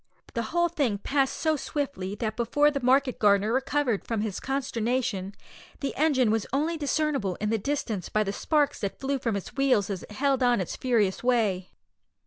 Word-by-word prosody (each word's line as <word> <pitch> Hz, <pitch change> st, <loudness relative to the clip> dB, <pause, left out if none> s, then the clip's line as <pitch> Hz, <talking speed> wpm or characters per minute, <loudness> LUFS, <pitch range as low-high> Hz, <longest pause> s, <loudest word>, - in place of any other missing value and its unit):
The 235 Hz, -, -1 dB
whole 345 Hz, +1 st, +2 dB
thing 280 Hz, -11 st, 0 dB
passed 270 Hz, +6 st, 0 dB
so 315 Hz, -1 st, +1 dB
swiftly 275 Hz, -, -3 dB
that 215 Hz, 0 st, -3 dB
before 290 Hz, +6 st, +3 dB
the 280 Hz, -1 st, -3 dB
market 260 Hz, +1 st, +3 dB
gardener 205 Hz, +1 st, +3 dB
recovered 265 Hz, -4 st, 0 dB
from 225 Hz, -3 st, -2 dB
his 210 Hz, -3 st, -3 dB
consternation 235 Hz, -7 st, -2 dB, 0.4 s
the 275 Hz, -, -3 dB
engine 265 Hz, -6 st, +3 dB
was 220 Hz, -1 st, 0 dB
only 310 Hz, +5 st, 0 dB
discernible 290 Hz, -, 0 dB
in 210 Hz, +3 st, -2 dB
the 225 Hz, -, +1 dB
distance 220 Hz, -, -2 dB
by 215 Hz, -, +2 dB
the 200 Hz, -1 st, -3 dB
sparks 295 Hz, +5 st, +1 dB
that 200 Hz, -, -4 dB
flew 275 Hz, 0 st, -1 dB
from 230 Hz, -4 st, -1 dB
its 200 Hz, -, -5 dB
wheels 255 Hz, -8 st, +2 dB
as 190 Hz, -3 st, -4 dB
it -, -, -11 dB
held 270 Hz, +3 st, +1 dB
on 245 Hz, -1 st, +4 dB
in 205 Hz, -, -1 dB
its 180 Hz, -, -4 dB
furious 225 Hz, -7 st, +1 dB
way. 215 Hz, -7 st, +1 dB
245 Hz, 190 wpm, -27 LUFS, 210-280 Hz, 0.4 s, on